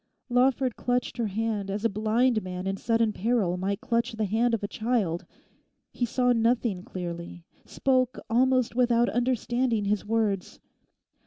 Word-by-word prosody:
Lawford 250 Hz, 0 st, +2 dB
clutched 245 Hz, +1 st, -1 dB
her 235 Hz, -2 st, 0 dB
hand 210 Hz, -1 st, -2 dB
as 205 Hz, +3 st, -3 dB
a -, -, +7 dB
blind 220 Hz, +3 st, +1 dB
man 185 Hz, -1 st, -6 dB
in 195 Hz, 0 st, -1 dB
sudden 230 Hz, +1 st, +1 dB
peril 210 Hz, -4 st, +1 dB
might 195 Hz, +3 st, -2 dB
clutch 240 Hz, -1 st, 0 dB
the 220 Hz, -1 st, -1 dB
hand 230 Hz, +4 st, +2 dB
of 215 Hz, -, -7 dB
a -, -, -1 dB
child. 215 Hz, -7 st, -1 dB, 0.6 s
He 240 Hz, -, -1 dB
saw 250 Hz, +1 st, +2 dB
nothing 230 Hz, -4 st, +1 dB
clearly; 175 Hz, -2 st, -7 dB, 0.2 s
spoke 255 Hz, -2 st, +1 dB
almost 255 Hz, +1 st, +2 dB
without 240 Hz, -1 st, +3 dB
understanding 240 Hz, -2 st, 0 dB
his 205 Hz, 0 st, 0 dB
words. 210 Hz, -3 st, -1 dB
225 Hz, 150 wpm, -27 LUFS, 200-245 Hz, 0.6 s, a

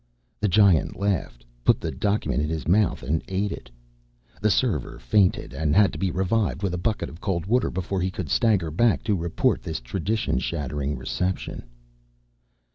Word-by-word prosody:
The 105 Hz, -, +1 dB
Giant 100 Hz, -4 st, +4 dB
laughed, 90 Hz, -12 st, -2 dB, 0.2 s
put -, -, +4 dB
the -, -, -3 dB
document 100 Hz, -, 0 dB
in 75 Hz, -, -1 dB
his 80 Hz, -2 st, -3 dB
mouth 100 Hz, -2 st, +2 dB
and 75 Hz, +5 st, 0 dB
ate 100 Hz, +2 st, -1 dB
it. -, -, -8 dB, 0.7 s
The 105 Hz, -, +3 dB
server 100 Hz, -, 0 dB
fainted 90 Hz, -, +1 dB
and 75 Hz, -1 st, 0 dB
had 105 Hz, -1 st, +5 dB
to -, -, -6 dB
be 95 Hz, -, +1 dB
revived 95 Hz, +4 st, 0 dB
with 95 Hz, -3 st, 0 dB
a -, -, -1 dB
bucket 110 Hz, +4 st, -1 dB
of 80 Hz, -, -12 dB
cold 90 Hz, -4 st, -1 dB
water 120 Hz, +4 st, +2 dB
before 95 Hz, +1 st, -2 dB
he 95 Hz, -, 0 dB
could 90 Hz, -3 st, -5 dB
stagger 95 Hz, -, +2 dB
back 115 Hz, +7 st, +2 dB
to 105 Hz, -, +1 dB
report 85 Hz, -2 st, 0 dB
this 80 Hz, -, -4 dB
tradition 95 Hz, -, -1 dB
shattering 70 Hz, +1 st, -3 dB
reception. 90 Hz, +8 st, -3 dB
90 Hz, 175 wpm, -25 LUFS, 75-100 Hz, 0.7 s, had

